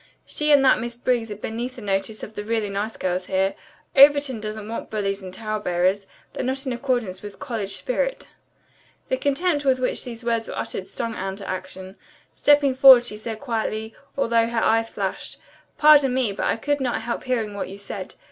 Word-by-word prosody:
She 300 0 0
and 280 -2 +6
that 260 - +5
Miss 240 0 -5
Briggs 240 -2 0
are 210 - -5
beneath 235 +4 -5
the 245 - -10
notice 195 +2 -2
of 215 - -7
the 205 - -5
really 220 -1 -1
nice 205 +3 -3
girls 185 0 -2
here. 190 +1 +1 0.4
Overton 280 -3 +6
doesn't 215 0 -6
want 230 - -5
bullies 200 -2 -2
and 185 -1 -8
tale 215 +2 -4
bearers. 185 +1 0 0.3
They're - - -3
not 265 +2 -2
in 260 - -1
accordance 240 -7 -2
with 205 -1 -9
college 210 -5 -3
spirit." - - -2 0.8
The 260 - +1
contempt 290 +3 0
with 265 -2 +3
which 255 0 -1
these 240 -2 -7
words 230 -1 -1
were - - -6
uttered 185 - -4
stung 230 -1 -4
Anne 190 -2 -4
to 195 -1 -9
action. 185 +1 -6 0.4
Stepping 290 -2 +4
forward 260 -2 +9
she 225 -3 -5
said 220 +1 -6
quietly, 220 -3 -3 0.2
although 230 -3 +2
her 230 -1 -1
eyes 225 +1 +2
flashed, - - -4 0.4
"Pardon 290 -4 +6
me, 255 -5 +1
but 195 - -2
I - - +2
could 290 +4 -1
not 245 -3 -1
help 235 +2 -4
hearing 230 -5 -1
what 200 - -4
you 195 - -8
said. 200 -1 -7
225 Hz, 200 wpm, -23 LUFS, 200-255 Hz, 0.8 s, forward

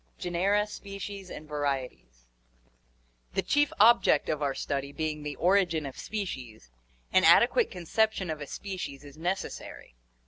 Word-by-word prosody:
Genera, 195 +4 +1
Species, 200 -2 -8
and 155 - -9
Varieties. 135 - -4 0.5
— - - -39
The - - +1
chief 290 0 +2
object 235 +3 +5
of 155 -1 -1
our 140 -2 0
study 140 0 -3
being 155 0 -3
the 150 -1 -5
origin 175 -3 +2
of 135 - -6
species, 125 - -6 0.4
an 185 - +5
adequate 240 - +6
conception 190 +1 0
of 155 -1 -5
a 145 - -5
species 180 -8 -6
is 145 -1 -12
necessary. 175 - -5
160 Hz, 140 wpm, -29 LUFS, 140-195 Hz, 0.5 s, adequate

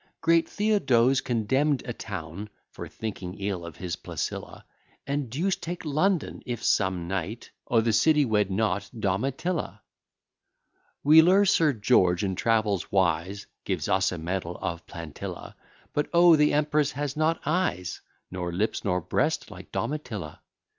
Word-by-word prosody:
Great 165 0 +3
Theodose 135 - +2
condemn'd 130 +5 +1
a 120 - -4
town 100 -1 -7 0.2
For - - -8
thinking 95 -4 -6
ill 100 -3 -3
of 85 -3 -8
his 90 -2 -4
Placilla: - - -5 0.4
And 140 -2 -2
deuce 175 - 0
take 175 0 -6
London! 155 +4 0
if 120 -2 -5
some 95 -4 +1
knight 95 +5 -4 0.2
O' 115 -2 +3
th' 115 -1 +1
city 150 +5 +4
wed 105 -4 +1
not 100 0 -1
Domitilla. 135 - -2 1.2
Wheeler, 165 +7 +7
Sir 160 -6 +3
George, 100 -6 +3
in 95 -1 0
travels 105 -2 0
wise, 95 +1 0 0.2
Gives - - -2
us 95 0 +2
a 90 - -4
medal 90 +1 -3
of 85 0 -4
Plantilla; 80 -4 -8 0.4
But 150 - -1
O! 170 -1 +7
the 150 -1 +4
empress 150 0 +1
has 145 0 -3
not 155 +2 +1
eyes, 150 - -1 0.3
Nor 90 -1 -3
lips, 100 +6 -1
nor 90 -3 0
breast, - - -1
like - - -11
Domitilla. 110 - -4
115 Hz, 140 wpm, -27 LUFS, 95-150 Hz, 1.2 s, Wheeler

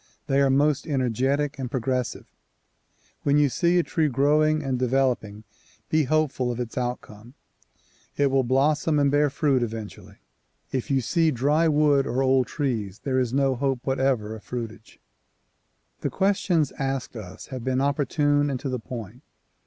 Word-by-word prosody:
They 135 +1 +2
are 140 - +3
most 145 +2 +2
energetic 135 +2 0
and 130 -2 -3
progressive. 125 0 -2 1.0
When 145 +1 +2
you 145 -1 +4
see 170 +8 +2
a 175 - +3
tree 160 -2 0
growing 150 +3 +2
and 130 -2 -1
developing 125 -5 0 0.5
be 155 -1 +3
hopeful 140 -4 0
of 120 - -5
its 120 -2 -5
outcome. 120 -1 -5 0.8
It 140 -1 +2
will 135 0 +3
blossom 150 +5 +2
and 140 -1 +3
bear 145 0 +3
fruit 135 -2 +1
eventually. 110 -2 -6 0.5
If 130 -2 -3
you 135 -1 +2
see 165 +6 +2
dry 150 +5 +2
wood 145 -3 +3
or 130 +2 0
old 130 -1 +3
trees, 115 - -3
there 130 -2 0
is 125 -3 0
no 135 0 +2
hope 135 -1 -1
whatever 130 -5 0
of 110 - -12
fruitage. 115 -2 -7 1.0
The - - -2
questions 185 -6 +1
asked 135 -2 -3
us 100 -5 -9
have 130 -2 -5
been 130 0 0
opportune 145 +1 +1
and 130 -2 -2
to 140 - -3
the 130 -1 -2
point. 115 0 -8
135 Hz, 160 wpm, -25 LUFS, 125-145 Hz, 1.0 s, you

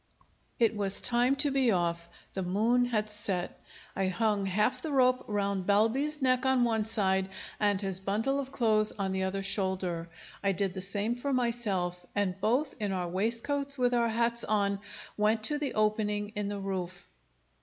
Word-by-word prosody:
It 230 -1 +2
was 200 -1 +2
time 245 +2 +3
to 285 +1 +2
be 270 -2 +2
off. 170 -3 0 0.2
The 190 - -3
moon 220 +7 +2
had 215 -3 -1
set. 205 -4 -3 0.3
I 195 -1 0
hung 205 +1 0
half 210 +6 +1
the 315 - -4
rope 255 -2 +3
round 200 -3 -1
Balbi's 265 +9 +2
neck 255 0 +2
on 265 -2 +3
one 225 -2 +1
side 190 -3 +1 0.3
and 205 -2 +2
his 195 -2 0
bundle 220 +8 0
of 270 -1 -5
clothes 215 -5 +3
on 195 -2 -2
the 190 0 -1
other 190 +1 -2
shoulder. 190 -4 -1 0.3
I 195 -1 +2
did 190 0 -1
the 190 - -5
same 205 +4 -1
for 250 +4 -3
myself; 205 -8 -1
and 200 -2 +1
both, 260 +8 +1
in 205 -2 -1
our 180 -2 -2
waistcoats 235 +9 0
with 245 -1 +2
our 235 -1 +2
hats 235 +1 0
on, 200 -2 +1 0.4
went 215 +1 +2
to 295 +6 +2
the 290 -3 -2
opening 210 -1 0
in 210 -1 -4
the 205 0 -3
roof. 190 -2 -5
210 Hz, 175 wpm, -30 LUFS, 195-240 Hz, 0.4 s, time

